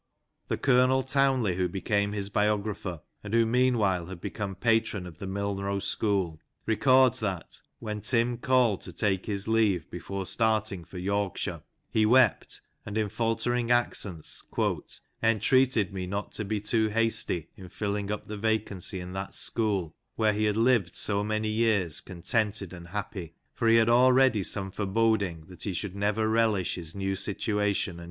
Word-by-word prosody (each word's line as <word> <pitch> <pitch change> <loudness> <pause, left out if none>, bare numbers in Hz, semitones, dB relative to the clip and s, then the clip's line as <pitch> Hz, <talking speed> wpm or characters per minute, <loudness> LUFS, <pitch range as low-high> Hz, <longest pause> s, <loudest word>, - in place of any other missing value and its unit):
The - - -1
Colonel 130 0 +3
Townley 130 -8 +2
who 90 -1 +1
became 100 +2 0
his 100 -1 -2
biographer, 105 -5 -1 0.2
and 105 +3 -3
who 115 -1 +5
meanwhile 110 -7 +2
had 95 -2 -8
become 100 +1 -4
patron 110 -2 +1
of 85 -2 -11
the 100 - -5
Milnrow 100 0 -2
school, 95 -6 -1 0.3
records 130 +2 +4
that, 95 -5 -4 0.2
when 105 -1 -5
Tim 120 +1 +1
called 125 -6 +2
to 90 - -8
take 95 0 -1
his 100 -1 -2
leave 105 -7 +2
before 100 -1 -5
starting 110 -4 0
for 95 - -10
Yorkshire, 100 +1 -2 0.3
he 110 -1 +3
wept, 130 +3 +3 0.2
and 105 0 -5
in 110 -2 0
faltering 115 +2 0
accents 105 -8 -1 0.4
" - - -13
entreated 115 -2 +3
me 95 -1 -4
not 100 +2 -4
to 105 - -4
be 105 +1 -1
too 110 +1 +1
hasty 110 -7 0
in 95 -2 -11
filling 100 0 -3
up 105 - -3
the 105 - -6
vacancy 105 -4 -2
in 90 0 -7
that 95 +1 -5
school, 100 -8 -1 0.2
where 110 -1 +2
he 105 +1 0
had 105 0 +1
lived 115 -6 +2
so 100 -1 +1
many 110 +1 -1
years 105 -7 +1
contented 100 +1 -1
and 85 -1 -10
happy; 95 -3 -5 0.2
for 115 - -1
he 115 - +6
had 115 -1 +5
already 125 -1 +5
some 95 0 -3
foreboding 100 -5 0
that 90 +1 -14
he 100 - -2
should 95 +1 -4
never 105 +2 0
relish 110 -4 +2
his 85 -1 -7
new 95 0 -1
JOHN - - -2
COLLIER 105 - -2
(" - - -8
TIM 105 - 0
BOBBIN^'). 100 -4 0
105 Hz, 170 wpm, -28 LUFS, 95-115 Hz, 0.4 s, he